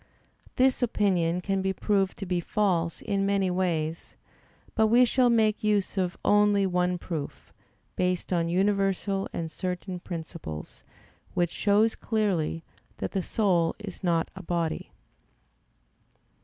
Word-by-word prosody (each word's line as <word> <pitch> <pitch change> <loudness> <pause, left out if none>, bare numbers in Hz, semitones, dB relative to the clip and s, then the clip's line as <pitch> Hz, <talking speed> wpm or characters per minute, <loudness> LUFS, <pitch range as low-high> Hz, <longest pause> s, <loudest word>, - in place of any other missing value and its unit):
This 260 +1 +3
opinion 180 -7 +1
can 195 +1 -1
be 190 0 0
proved 195 0 0
to 195 - -5
be 180 -1 0
false 175 -3 0
in 200 -2 0
many 195 -2 +1
ways; 165 -3 -2 0.6
but 220 -1 +3
we 240 +3 +6
shall 250 0 +3
make 220 -2 +2
use 210 -2 +1
of 185 -2 -1
only 205 -1 +4
one 180 -1 +1
proof, 160 -5 -6 0.4
based 180 0 -1
on 170 -1 +1
universal 195 +1 +1
and 165 -1 -4
certain 180 +1 -4
principles, 160 - -7 0.5
which 175 -2 +1
shows 215 +2 +3
clearly 190 -8 -1 0.3
that - - -4
the 195 - -1
soul 180 -5 +1
is 205 -4 -9
not 170 -2 +1
a 190 - -7
body. 170 -3 -2
190 Hz, 130 wpm, -27 LUFS, 175-205 Hz, 0.6 s, we